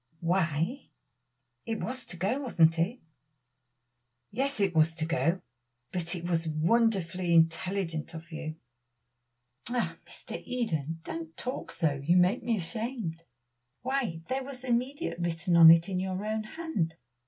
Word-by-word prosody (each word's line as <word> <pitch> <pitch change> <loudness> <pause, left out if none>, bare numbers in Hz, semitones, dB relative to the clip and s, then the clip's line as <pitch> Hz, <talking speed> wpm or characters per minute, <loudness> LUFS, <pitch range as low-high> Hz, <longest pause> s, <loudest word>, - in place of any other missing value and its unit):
"Why, 170 - 0 0.8
it 225 -1 -3
was 255 +1 -4
to 175 - -4
go, 200 +10 0
wasn't 170 - +3
it?" 205 +10 0 1.3
"Yes, 270 +3 -1
it 195 -3 +2
was 160 0 +3
to 160 -1 -1
go, 170 +2 +1 0.5
but 175 0 -2
it 175 0 -5
was 165 -2 0
wonderfully 180 0 +2
intelligent 165 0 +1
of 165 +2 -9
you." 155 -1 -5 1.1
"La! 245 -1 -1
Mr. - - -6
Eden, 165 - -2
don't 165 -1 -6
talk 255 - -4
so; 145 -5 0
you 170 +5 +4
make 180 +2 +4
me 230 -1 0
ashamed. 195 -3 -4 0.6
Why, 250 -11 -1
there 260 +1 -1
was 260 -1 -6
'immediate' 255 - -1
written 170 +1 0
on 165 -1 +10
it 165 +1 +7
in 185 -2 -1
your 190 +2 -2
own 215 0 -1
hand. 215 - -2
180 Hz, 140 wpm, -29 LUFS, 165-235 Hz, 1.3 s, on